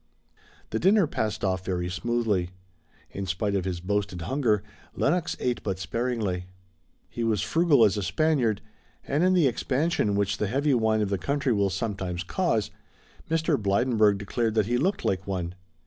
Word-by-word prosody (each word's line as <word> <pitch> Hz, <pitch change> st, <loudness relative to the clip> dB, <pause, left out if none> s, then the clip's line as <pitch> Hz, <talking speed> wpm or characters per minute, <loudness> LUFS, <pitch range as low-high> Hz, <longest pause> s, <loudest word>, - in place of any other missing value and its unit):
The 110 Hz, -, 0 dB
dinner 195 Hz, +1 st, +4 dB
passed 110 Hz, -7 st, -2 dB
off 95 Hz, -1 st, 0 dB
very 90 Hz, -2 st, -2 dB
smoothly. 105 Hz, -1 st, 0 dB, 0.6 s
In 100 Hz, -1 st, -5 dB
spite 100 Hz, +3 st, -1 dB
of 95 Hz, -2 st, 0 dB
his 90 Hz, -2 st, -2 dB
boasted 95 Hz, -1 st, -2 dB
hunger, 115 Hz, -, +1 dB, 0.3 s
Lenox 170 Hz, +4 st, 0 dB
ate 125 Hz, -1 st, -1 dB
but 95 Hz, -3 st, -2 dB
sparingly. 100 Hz, -2 st, -2 dB, 0.6 s
He 120 Hz, -, -4 dB
was 110 Hz, -3 st, +1 dB
frugal 160 Hz, -8 st, +4 dB
as 105 Hz, -1 st, +1 dB
a -, -, -1 dB
Spaniard, 115 Hz, -, +1 dB, 0.5 s
and 145 Hz, +5 st, +1 dB
in 185 Hz, 0 st, +4 dB
the 175 Hz, -4 st, +4 dB
expansion 135 Hz, -2 st, +1 dB
which 100 Hz, -1 st, 0 dB
the 105 Hz, -, 0 dB
heavy 140 Hz, +6 st, +1 dB
wine 110 Hz, -2 st, +2 dB
of 105 Hz, -, 0 dB
the 100 Hz, -, 0 dB
country 140 Hz, -, 0 dB
will 100 Hz, -2 st, +2 dB
sometimes 95 Hz, -4 st, -3 dB
cause, -, -, 0 dB, 0.6 s
Mr. 160 Hz, -4 st, +1 dB
Blydenburg 105 Hz, +1 st, +3 dB
declared 110 Hz, +2 st, -1 dB
that 110 Hz, -3 st, +3 dB
he 120 Hz, +3 st, 0 dB
looked 195 Hz, +7 st, 0 dB
like 95 Hz, 0 st, -1 dB
one. 90 Hz, -3 st, -3 dB
110 Hz, 165 wpm, -26 LUFS, 95-130 Hz, 0.6 s, dinner